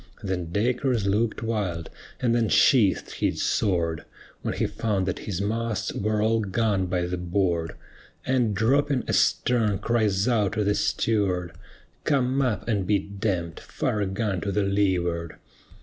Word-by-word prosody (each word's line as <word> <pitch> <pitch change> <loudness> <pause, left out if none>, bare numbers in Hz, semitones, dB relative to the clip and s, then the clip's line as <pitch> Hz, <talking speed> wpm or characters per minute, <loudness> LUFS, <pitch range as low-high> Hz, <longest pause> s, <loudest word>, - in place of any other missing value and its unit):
Then 90 -4 -3
Dacres 120 +2 0
look'd 105 +3 0
wild, 95 -8 -2 0.3
and 120 -2 +1
then 115 -2 +2
sheath'd 115 -8 +4
his - - 0
sword, 85 -6 0 0.4
When - - -3
he - - 0
found 105 -4 -1
that 90 - -2
his 95 -3 -2
masts 110 0 -2
were 105 +1 0
all 115 +1 +2
gone 100 -2 0
by 90 0 0
the 90 0 -3
board, 85 -2 0 0.5
And 125 -5 +1
dropping 130 +5 +2
astern 110 -5 +2
cries 105 -3 +1
out 110 -5 +2
to 110 -1 0
the 105 +1 +2
steward, 100 -4 0 0.5
"Come 135 -2 +1
up 125 -6 -1
and 100 -5 0
be 105 - +4
d 100 +1 -8
d, 90 -6 -2
fire 105 - -2
a 100 - 0
gun 95 -2 -2
to 100 - -2
the 105 +1 +1
leeward." 90 -4 0
105 Hz, 155 wpm, -25 LUFS, 95-115 Hz, 0.5 s, sheath'd